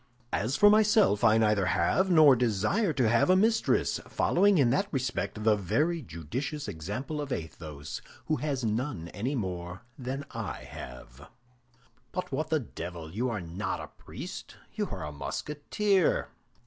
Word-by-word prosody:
As 115 +7 0
for 205 - +7
myself, 210 - +4
I 110 - +6
neither 105 -4 +3
have, 190 - +2
nor 155 -6 +7
desire 125 - +1
to 130 -6 +2
have, 115 +8 +3
a 185 - +6
mistress, 220 +4 +2
following 200 +1 +3
in 130 -5 +4
that 195 +10 +1
respect 125 -5 -2
the 110 -1 +5
very 150 - 0
judicious 120 - -5
example 105 - -4
of 145 -2 -6
Athos, 80 - -6 0.2
who 155 - 0
has 140 -5 -2
none 110 - -2
any 125 +10 -3
more 90 -4 -4 0.2
than 135 +2 -4
I - - -5
have." 60 +3 -10 0.8
"But 185 - -4
what 155 +4 -2
the 160 -1 +2
devil! 85 - -7
You 120 +5 0
are 105 -5 -3
not 90 +4 -3
a - - -7
priest, - - -9 0.2
you - - -2
are - - -5
a 75 - -5
Musketeer!" 150 - 0
125 Hz, 155 wpm, -29 LUFS, 95-155 Hz, 0.8 s, for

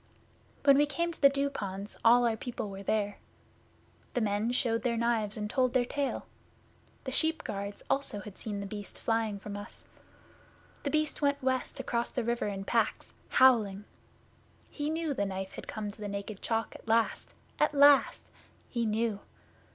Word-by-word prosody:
'When 280 -1 +7
we 295 - +4
came 335 +4 -1
to 330 - -13
the 280 - +8
Dew 280 0 0
ponds 200 -4 -5
all 240 +1 +6
our 230 -2 +2
people 220 -3 -5
were 195 0 -7
there. 205 0 -1 1.0
The 245 - +2
men 210 +2 +1
showed 230 -2 +1
their 235 -2 0
knives 225 -3 +1
and 210 -1 -2
told 255 +3 +1
their 250 -1 +4
tale. 280 +2 -2 0.8
The 260 - -4
sheep 320 +4 +2
guards 200 0 -5
also 270 -7 -1
had 200 -1 -10
seen 205 -2 -3
The - - -4
Beast 205 0 -6
flying 225 -2 0
from 200 +1 -7
us. 205 0 -9 1.0
The 285 - -2
Beast 310 +1 0
went 280 -1 +1
west 260 -1 -1
across 235 0 -1
the 250 - -2
river 235 -1 -1
in 195 -1 -4
packs 225 +1 0 0.2
howling! 215 -6 +4 0.9
He 295 0 -3
knew 320 -1 -1
the 205 - -1
Knife 190 0 -5
had - - -8
come 210 -2 -4
to 215 - -16
the 205 - -3
Naked 200 0 -5
Chalk 225 -1 -1
at - - -13
last 225 0 +1 0.2
at 300 0 +2
last! 285 0 +6 0.5
He 235 -2 0
knew! 215 -1 0
230 Hz, 175 wpm, -30 LUFS, 205-265 Hz, 1.0 s, the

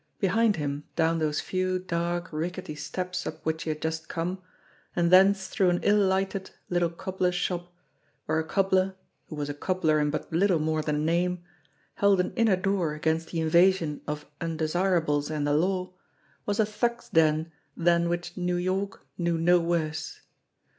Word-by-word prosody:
Behind 215 +2 +3
him, 145 -1 -3
down 165 0 +2
those 150 -1 0
few 185 0 -1
dark, 175 0 -2
rickety 175 +2 -4
steps 180 +5 -4
up - - -7
which 160 0 -1
he - - -2
had 155 0 -3
just 160 0 -3
come, 180 +2 -3 0.5
and 170 -1 +2
thence 195 +1 +6
through 190 -2 +2
an 175 0 +1
ill 210 +1 +4
lighted 190 0 0 0.2
little 175 -1 +2
cobbler's 180 +1 -2
shop, 175 0 -2 0.5
where 155 +1 +1
a - - 0
cobbler, 190 +2 +1 0.3
who 155 - -7
was 145 -1 -3
a 145 - -3
cobbler 160 0 +1
in 150 0 +1
but 155 +2 -4
little 185 +1 +3
more 155 0 0
than 150 0 -1
name, 175 +2 0 0.5
held 200 -2 +3
an 180 - 0
inner 225 -4 +4
door 185 -5 0
against 160 +2 0
the 165 - -2
invasion 170 -1 +3
of 150 0 -4 0.2
undesirables 165 -2 0
and 150 -2 -1
the 145 - +1
law, 185 +4 0 0.5
was 205 +1 -1
a 220 - +5
thug's 235 +3 -2
den 160 0 +2 0.3
than 170 0 +3
which 175 0 -3
New 180 -1 -1
York 190 +2 -2
knew 170 -1 +1
no 175 +2 +4
worse. 160 -2 -2
175 Hz, 170 wpm, -27 LUFS, 160-185 Hz, 0.5 s, thence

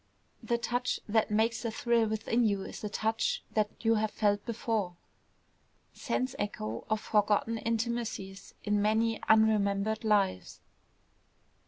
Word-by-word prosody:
the 235 - 0
touch 245 +1 -1
that 220 0 +2
makes 225 +3 +1
a 230 - -1
thrill 230 0 +1
within 220 +2 0
you 200 -3 +1
is - - -8
a 210 - -2
touch 220 +2 -1
that 210 -1 +1 0.2
you 225 - +5
have 220 0 +1
felt 205 -1 +1
before, 220 -5 -2 1.0
sense 255 0 -2
echo 115 - -3
of 215 0 +1
forgotten 210 +2 +1
intimacies 230 -4 -3
in 210 -1 +1
many 220 +2 +1
unremembered 215 -1 +3
lives! 200 - +1
220 Hz, 130 wpm, -30 LUFS, 205-230 Hz, 1.0 s, you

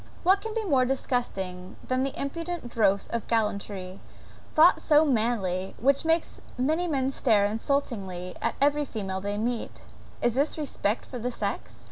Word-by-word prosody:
What 380 +3 +4
can 445 0 -5
be 445 -1 -1
more 275 -8 +3
disgusting 195 -8 -2
than 255 0 +1
that 270 0 -2
impudent 330 0 -4
dross 200 -4 +2
of 235 -1 -3
gallantry, 200 -4 -2 0.6
thought 325 +3 +6
so 305 0 +5
manly, 215 -8 0
which 275 +5 +2
makes 325 +1 0 0.2
many 315 +8 +1
men 270 -4 0
stare 220 -7 +3
insultingly 205 -6 -2
at - - 0
every 290 +1 +3
female 195 -8 -4
they 205 +1 -3
meet? 230 +2 -3 0.4
Is 240 - +1
this 280 +6 0
respect 250 -7 -1
for 250 - -7
the 245 +2 -2
sex? 245 - -4
245 Hz, 155 wpm, -27 LUFS, 205-285 Hz, 0.6 s, thought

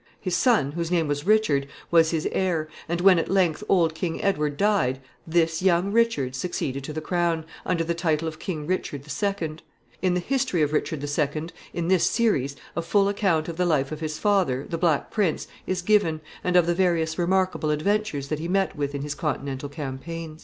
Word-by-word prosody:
His 185 -3 -1
son, 215 - +3
whose 170 +1 -3
name 170 -3 +1
was 145 +3 -2
Richard, 205 -11 +3 0.2
was 165 -1 +5
his 160 -2 -1
heir, 170 -5 0 0.2
and 170 +1 -1
when 185 -2 +6
at - - -2
length 185 -2 +2
old 170 -4 +3
King 165 0 -3
Edward 150 -7 0
died, 195 -11 +2 0.3
this 165 0 +1
young 185 +1 +2
Richard 225 - +2
succeeded 135 -2 -3
to - - -5
the 155 +1 -4
crown, 170 -1 0 0.2
under 170 -2 +1
the 170 +1 -1
title 165 -2 0
of 155 -1 -6
King 155 -6 -4
Richard 150 -5 -3
II. 170 -3 -2 0.4
In 185 -2 +2
the - - +2
history 255 - 0
of 150 0 0
Richard 150 -1 -1
II., 150 +2 -1 0.2
in 170 -1 -3
this 185 -1 +3
series, 140 - +1 0.2
a 170 - 0
full 200 +4 +2
account 190 -6 +1
of 165 -1 -5
the 180 - +2
life 140 -4 +1
of 155 - -5
his 155 -1 -3
father, 185 -11 +1
the 165 - -3
Black 165 -5 +1
Prince, 200 -8 0 0.2
is 185 -1 -1
given, 180 -6 +2 0.2
and 180 0 0
of 175 -2 +6
the 175 - +2
various 170 -3 +1
remarkable 185 -2 +1
adventures 150 -2 0
that 155 - -2
he 165 - -3
met 195 +2 +1
with 145 -1 -2
in 140 - -3
his 145 0 -3
Continental 140 -3 -3
campaigns. 155 +3 -6
165 Hz, 200 wpm, -25 LUFS, 150-185 Hz, 0.4 s, when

